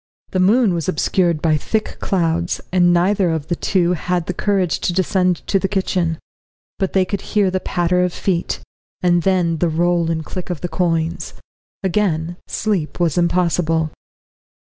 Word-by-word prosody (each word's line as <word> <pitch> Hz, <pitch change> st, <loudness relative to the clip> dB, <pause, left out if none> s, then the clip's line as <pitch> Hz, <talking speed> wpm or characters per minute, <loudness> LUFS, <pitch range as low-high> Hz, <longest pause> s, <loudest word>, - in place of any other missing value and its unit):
The 185 Hz, -, 0 dB
moon 205 Hz, +2 st, +4 dB
was 170 Hz, +1 st, -2 dB
obscured 170 Hz, -1 st, +1 dB
by 155 Hz, -2 st, +3 dB
thick 215 Hz, +8 st, -2 dB
clouds, 170 Hz, -2 st, 0 dB
and 175 Hz, -1 st, +4 dB
neither 185 Hz, +2 st, +2 dB
of 160 Hz, -2 st, -2 dB
the 175 Hz, -, +1 dB
two 180 Hz, 0 st, +1 dB
had 180 Hz, 0 st, -1 dB
the 180 Hz, -, -2 dB
courage 190 Hz, -2 st, 0 dB
to 175 Hz, -, -1 dB
descend 185 Hz, -1 st, +1 dB
to 195 Hz, -, +2 dB
the 195 Hz, -, 0 dB
kitchen. 185 Hz, -4 st, 0 dB, 0.6 s
But 190 Hz, -2 st, -1 dB
they 190 Hz, -1 st, +3 dB
could 195 Hz, +1 st, -3 dB
hear 205 Hz, -3 st, +1 dB
the 185 Hz, -, 0 dB
patter 180 Hz, 0 st, +1 dB
of 180 Hz, -, 0 dB
feet, 175 Hz, -1 st, -2 dB, 0.4 s
and 175 Hz, -1 st, +3 dB
then 175 Hz, -3 st, +1 dB
the 175 Hz, -, +2 dB
roll 170 Hz, +1 st, +1 dB
and 160 Hz, -1 st, -2 dB
click 185 Hz, +2 st, -6 dB
of 175 Hz, -5 st, -4 dB
the 175 Hz, -, -2 dB
coins. 165 Hz, -2 st, -1 dB, 0.5 s
Again 175 Hz, -3 st, 0 dB
sleep 195 Hz, -9 st, -2 dB
was 170 Hz, -4 st, +1 dB
impossible. 170 Hz, -2 st, +1 dB
175 Hz, 165 wpm, -19 LUFS, 165-185 Hz, 0.6 s, moon